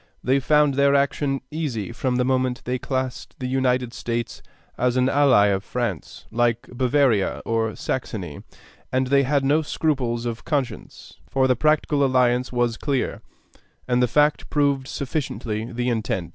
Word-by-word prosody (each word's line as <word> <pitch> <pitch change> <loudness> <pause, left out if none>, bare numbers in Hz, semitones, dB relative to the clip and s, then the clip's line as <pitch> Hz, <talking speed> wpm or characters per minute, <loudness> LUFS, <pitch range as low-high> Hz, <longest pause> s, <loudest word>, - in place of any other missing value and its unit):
They 130 +2 +3
found 150 +1 +3
their 140 +1 +3
action 140 0 +1
easy 135 -10 -3
from 125 +1 -1
the 125 0 +1
moment 130 -2 0
they 125 +1 -1
classed 130 -1 -4
the 130 - -5
United 125 -2 0
States 120 0 -4 0.3
as 125 +1 +1
an 130 0 +3
ally 135 -7 +4
of 95 -1 0
France, - - -4
like 120 0 +1
Bavaria 125 -4 +2
or 115 -1 0
Saxony; 95 - -4 0.5
and 130 +1 +1
they 140 +2 +3
had 140 0 +1
no 150 +3 +3
scruples 130 -7 -1
of 115 -1 -4
conscience, 135 -7 -4
for 135 -1 +2
the 130 - +3
practical 150 +1 +2
alliance 125 -1 +2
was 120 -2 0
clear, 140 -3 -2 0.7
and 125 0 +2
the 125 - +4
fact 150 +5 +2
proved 140 -3 +1
sufficiently 125 -6 -3
the 125 +1 -1
intent.... 110 -7 -2
130 Hz, 155 wpm, -23 LUFS, 120-140 Hz, 0.7 s, ally